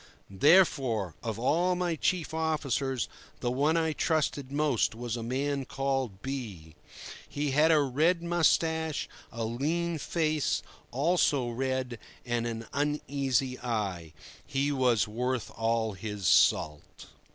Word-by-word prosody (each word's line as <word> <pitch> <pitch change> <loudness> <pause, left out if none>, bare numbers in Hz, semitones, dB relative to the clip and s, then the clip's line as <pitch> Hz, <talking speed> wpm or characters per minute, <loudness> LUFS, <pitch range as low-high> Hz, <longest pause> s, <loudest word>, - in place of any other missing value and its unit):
Therefore, 135 - +4
of 115 -3 -3
all 170 +9 +2
my 175 -2 -1
chief 165 0 -1
officers, 140 -5 -1 0.3
the 120 - -1
one 145 +6 +2
I 160 -1 +1
trusted 150 -4 0
most 145 -6 +1
was 120 0 -4
a 120 - -4
man 135 +4 -1
called 135 -7 -2
B—. 110 - -6 0.6
He 145 0 -2
had 150 +4 +4
a 155 - +5
red 155 +6 +2
moustache, 160 -2 +1 0.2
a 115 0 -4
lean 160 +8 -1
face, 155 -1 0 0.3
also 140 -3 +2
red, 130 -1 -2 0.3
and 120 -1 -1
an 115 0 -5
uneasy 140 -3 0
eye. 100 -9 -3 0.3
He 140 +2 -1
was 125 -6 +2
worth 125 +3 -2
all 115 -1 0
his 105 0 -6
salt. 75 -2 +2
135 Hz, 125 wpm, -29 LUFS, 115-155 Hz, 0.6 s, a